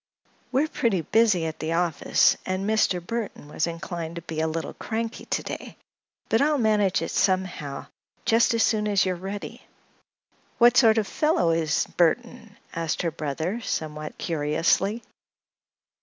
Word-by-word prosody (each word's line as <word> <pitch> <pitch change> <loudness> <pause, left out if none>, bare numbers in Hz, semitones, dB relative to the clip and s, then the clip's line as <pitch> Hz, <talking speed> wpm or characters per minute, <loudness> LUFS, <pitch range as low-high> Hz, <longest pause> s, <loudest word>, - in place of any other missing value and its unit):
"We're 270 +4 +2
pretty 230 - 0
busy 210 -1 +3
at 160 -1 -5
the 160 +1 -2
office 170 -2 +3
and 185 +1 -2
Mr. 215 -4 +2
Burthon 205 -3 -5
was 155 +2 -1
inclined 170 0 -5
to 170 - -7
be 160 -2 -5
a 160 - +1
little 160 +1 -4
cranky 225 +1 -4
to - - -1
day; - - -7 0.5
but 225 - +2
I'll 300 +1 +3
manage 210 -7 +2
it - - -4
somehow, 185 -7 -1 0.4
just 230 +1 +3
as 230 - +3
soon 210 -2 +1
as 200 -2 +3
you 185 - 0
are - - -5
ready." 195 +3 -7 1.0
"What 240 0 +6
sort 225 -3 +6
of 220 - +2
a - - -10
fellow 300 - +2
is 160 -2 +1
Burthon?" 225 +4 0 0.2
asked 165 0 -2
her 170 - 0
brother, 160 - -3
somewhat 155 -6 -4
curiously. 165 +8 0
185 Hz, 155 wpm, -25 LUFS, 165-225 Hz, 1.0 s, What